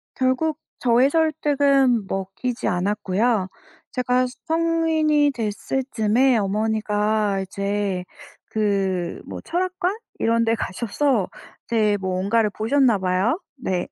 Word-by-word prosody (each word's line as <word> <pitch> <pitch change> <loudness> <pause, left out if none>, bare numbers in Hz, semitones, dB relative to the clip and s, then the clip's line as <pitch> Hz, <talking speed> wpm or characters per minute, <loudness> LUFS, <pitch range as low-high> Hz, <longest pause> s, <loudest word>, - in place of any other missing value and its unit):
결국 260 +4 +1 0.2
저의 245 +2 +4
설득은 285 -6 +2
먹히지 195 +7 -3
않았고요. 205 +3 0 0.4
제가 250 0 +1 0.2
성인이 320 -3 +2
됐을 230 +3 -2
쯤에 230 +3 +3
어머니가 210 0 0
이제 200 -1 -2 0.4
그 195 -4 -1
뭐 - - -6
철학관 365 +2 -1 0.2
이런 230 0 +2
데 225 0 +2
가셔서 230 +2 0 0.4
제 215 -3 +2
뭔가를 195 +4 +1
보셨나 235 +2 +2
봐요. 190 - +1 0.2
네. 185 -9 -2
225 Hz, 215 characters per minute, -23 LUFS, 200-275 Hz, 0.4 s, 저의